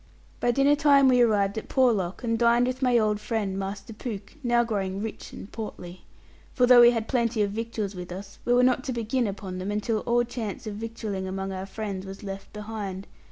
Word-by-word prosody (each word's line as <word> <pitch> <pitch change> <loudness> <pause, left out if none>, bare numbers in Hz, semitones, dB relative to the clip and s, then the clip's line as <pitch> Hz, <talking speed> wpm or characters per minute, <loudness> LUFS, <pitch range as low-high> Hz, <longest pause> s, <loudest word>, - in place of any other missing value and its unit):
By 245 - +1
dinner 275 +4 +4
time 285 -2 +5
we 250 -1 +5
arrived 205 -3 +2
at - - -13
Porlock, 225 -7 +1
and 230 -1 +1
dined 235 +1 +4
with 255 +1 -3
my 250 -2 +4
old 215 -2 +2
friend, 210 -3 -2
Master 195 +3 -5
Pooke, 210 -3 -7
now 240 -1 +3
growing 195 -4 -2
rich 220 +1 -6
and 195 - -10
portly. 185 -5 -8 0.5
For 250 - +4
though 245 -1 +8
we 240 - +9
had 230 -2 -1
plenty 235 -3 +1
of 200 - -1
victuals 220 -2 -3
with 180 -1 -8
us 195 +2 -8
we 240 - +2
were 250 0 +5
not 255 0 +3
to 260 - -2
begin 235 +1 0
upon 190 -2 -5
them, 185 +2 -4
until 210 +2 -1
all 240 +1 +2
chance 230 -4 -5
of 215 - -4
victualling 215 -3 -4
among 195 +1 -4
our 190 0 -5
friends 195 -2 -5
was 195 +1 -9
left 195 -1 -7
behind. 210 -3 -6
220 Hz, 210 wpm, -26 LUFS, 195-240 Hz, 0.5 s, we